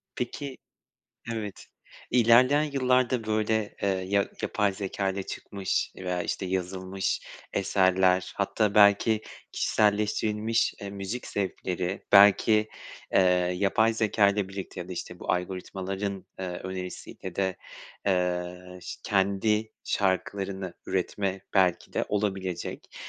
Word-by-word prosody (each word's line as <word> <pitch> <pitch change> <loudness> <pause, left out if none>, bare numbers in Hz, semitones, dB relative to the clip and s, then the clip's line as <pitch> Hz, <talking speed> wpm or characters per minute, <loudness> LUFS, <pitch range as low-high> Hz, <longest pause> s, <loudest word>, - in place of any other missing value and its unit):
Peki 130 +2 -4 0.8
Evet, 105 -3 -5 0.4
ilerleyen 125 +5 +5
yıllarda 130 -4 +1
böyle, 110 0 0
eee, 100 - +2
ya 95 +1 +1
yapay 105 -1 +1
zekâyla 95 0 -2
çıkmış 95 0 -3
veya, 90 -1 -2
işte, 90 +3 -3
yazılmış 95 +1 -2 0.3
eserler 95 -1 +2
hatta 100 +1 +1
belki 105 +1 +5 0.3
kişiselleştirilmiş, 105 +1 +1
eee, 100 -1 -5
müzik 100 +5 -5
zevkleri 95 -1 -3
belki, 105 +2 +6 0.4
eee, - - +5 0.4
yapay 110 +4 +3
zekâyla 105 -2 +2
birlikte 95 -1 -6
ya 90 - -7
da, 95 - -5
işte, 90 0 -6
bu - - -1
algoritmaların, 95 +2 -3
eee, 95 - -3 0.2
önerisiyle 95 -1 -6
de, 95 -2 0 0.5
eee, 90 -1 -1
şı - - -7
kendi 105 +2 +1
şarkılarını 95 -1 -1
üretme 95 +1 -1
belki 95 -3 +2
de - - 0
olabilecek. 95 -4 -3
100 Hz, 105 wpm, -27 LUFS, 95-105 Hz, 0.8 s, belki